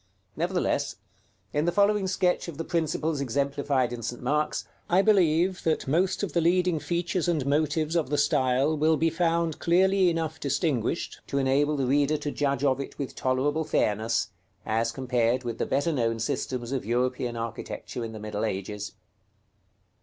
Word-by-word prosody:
Nevertheless, 170 -4 0 0.6
in 150 +2 +1
the 175 - +2
following 205 0 +3
sketch 185 -2 +1
of 165 -4 -7
the 165 - -3
principles 160 -2 -1
exemplified 140 -1 0
in 120 - -5
St. 120 +1 -4
Mark's, 150 +4 -1 0.2
I 185 +3 +4
believe 180 -3 +3
that 160 -4 0
most 180 +8 +1
of 185 -7 -3
the 170 - +2
leading 175 0 +2
features 175 +2 -1
and 160 -6 +1
motives 155 +2 +1
of 160 -6 +1
the 145 - 0
style 135 +1 +2
will 155 +1 +3
be 165 +1 +2
found 165 -1 0
clearly 190 +2 +4
enough 160 -2 -2
distinguished 140 - -1
to 140 - -2
enable 140 +2 +2
the 135 - 0
reader 145 +3 +2
to 145 - -4
judge 140 -2 -1
of 135 -2 +2
it 140 - -6
with 140 - -4
tolerable 140 +5 0
fairness, 115 -5 0 0.4
as 115 +1 0
compared 125 -1 0
with 120 -2 -4
the - - -1
better 145 +5 +1
known 115 -4 0
systems 120 +2 -3
of 135 -2 -1
European 125 +1 -1
architecture 115 +1 -5
in 115 - -5
the 110 - -8
middle 105 0 -4
ages. 105 0 -3
145 Hz, 170 wpm, -27 LUFS, 125-165 Hz, 0.6 s, I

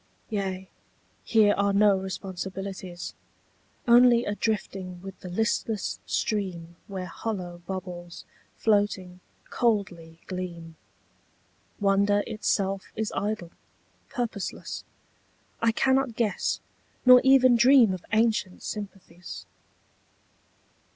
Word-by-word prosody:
Yea, 190 -2 -3 0.6
here 215 -2 +4
are 200 0 +2
no 205 0 +5
responsibilities. 190 -1 -5 0.7
Only 240 0 +6
a 205 - -1
drifting 195 -4 -3
with 195 -1 -9
the 180 - -8
listless 215 +2 -1
stream 180 -5 -2
Where 190 -2 -5
hollow 180 -2 -5
bubbles, 180 -2 -6 0.3
floating, 205 -4 +1 0.3
coldly 190 -8 -1
gleam. 170 -3 -6 1.0
Wonder 200 0 +3
itself 195 -3 -1
is 220 -1 -2
idle, 205 -5 -2 0.6
purposeless; 230 -5 -4 0.8
I 230 0 +4
cannot 265 0 +2
guess 220 -3 0 0.4
Nor 250 0 +9
even 260 -2 +6
dream 240 -3 +6
of 185 - -6
ancient 220 -4 +1
sympathies. 195 -3 -7
200 Hz, 90 wpm, -27 LUFS, 185-220 Hz, 1.0 s, Nor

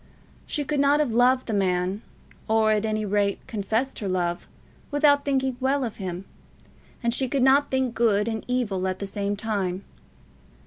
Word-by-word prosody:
She 295 - -1
could 295 +1 -1
not 285 +1 +4
have 285 -7 0
loved 250 +2 +3
the 225 - -3
man, 185 0 0 0.5
or 220 -1 +3
at 215 0 +1
any 215 0 -1
rate 200 0 0
confessed 225 +2 -2
her 200 - -3
love, 175 -1 -1 0.4
without 290 -1 +3
thinking 265 -2 0
well 270 +1 +1
of 230 -4 -4
him; 185 -1 -5 0.8
and 235 0 +1
she 260 +1 -1
could 270 -1 +1
not 275 +2 +4
think 260 -2 0
good 220 -3 +2
and 220 -1 -3
evil 210 -7 -1
at 185 0 -2
the 200 - -5
same 200 +1 -2
time. 195 -3 -2
220 Hz, 175 wpm, -25 LUFS, 200-265 Hz, 0.8 s, not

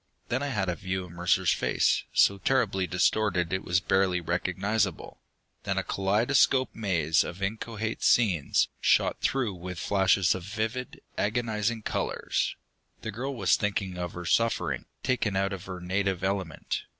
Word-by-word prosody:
Then 125 +3 0
I 145 - -1
had 105 -8 -1
a 90 - 0
view 95 +1 -3
of 90 - -13
Mercer's 90 +1 +2
face, - - +1
so 100 0 +4
terribly 100 -7 +1
distorted 90 -1 +1
it 95 - -1
was 90 0 +2
barely 95 0 +2
recognizable. 90 +3 -1 0.4
Then - - -2
a - - +1
kaleidoscopic 120 +7 +2
maze 85 -7 +2
of 90 - -7
inchoate 110 +2 -3
scenes, 95 -11 +3
shot - - +2
through 125 -7 0
with 90 0 -7
flashes 95 -1 +3
of 95 - -5
vivid, 110 +5 -4 0.2
agonizing 110 0 -1
colors. - - -1 0.5
The 110 - -3
girl 130 +6 -4
was 95 -6 +3
thinking 100 -3 -2
of 90 -1 -4
her 90 0 -7
suffering, 115 +7 +1 0.2
taken 120 -6 0
out 95 +1 0
of 95 - -7
her 90 -1 -6
native 95 +1 -1
element. 95 -5 -2
95 Hz, 150 wpm, -28 LUFS, 90-110 Hz, 0.5 s, so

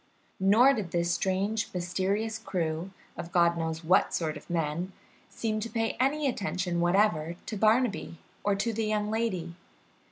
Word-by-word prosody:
Nor 220 +8 +6
did 210 -8 -3
this 170 0 0
strange, 200 +3 0
mysterious 195 +5 -1
crew, 170 -4 -2 0.3
of 170 - -7
God 170 -1 +4
knows 165 0 -3
what 175 +3 +3
sort 160 -2 -1
of 150 - -11
men, 170 +2 -2 0.4
seem 215 -1 -2
to 225 +2 -4
pay 225 0 -1
any 285 +3 +2
attention 185 -7 -1
whatever 175 -3 +2
to 220 - -4
Barnaby 215 -3 +2 0.3
or 205 -1 +2
to 220 +4 -1
the 220 0 -1
young 210 0 0
lady. 190 -7 -1
195 Hz, 155 wpm, -29 LUFS, 170-220 Hz, 0.4 s, Nor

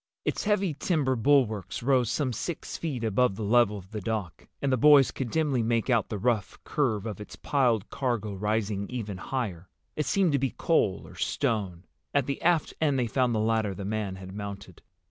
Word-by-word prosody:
Its - - -1
heavy 200 -5 +1
timber 145 -4 0
bulwarks 110 - +1
rose 125 -3 +3
some 135 -5 0
six 170 +7 -4
feet 140 -8 -3
above 110 0 +2
the 110 - -5
level 105 -1 +3
of 95 0 -12
the 105 -1 -4
dock, 105 -5 -4
and 140 - 0
the - - +4
boys 140 +1 +6
could 130 -3 -4
dimly 145 -3 +1
make 115 +2 +1
out 115 -4 +2
the 105 - -3
rough 110 -2 0
curve 115 -8 0
of 105 -2 -5
its 105 - -9
piled 120 -7 +1
cargo 120 -6 -1
rising 105 0 -1
even 110 -6 -4
higher. 95 -6 -4 0.3
It 150 -3 -1
seemed 190 -1 +3
to 140 - +2
be 135 0 -1
coal 105 - +1
or - - -12
stone. 95 -6 -1 0.3
At 140 -3 +3
the 140 0 -3
aft 170 -2 +2
end 145 -4 +2
they 125 - +1
found 120 0 +1
the - - +1
ladder 110 -2 +1
the 100 - -6
man 105 -2 -2
had 95 0 -9
mounted. 100 -3 -7
115 Hz, 200 wpm, -28 LUFS, 105-135 Hz, 0.3 s, boys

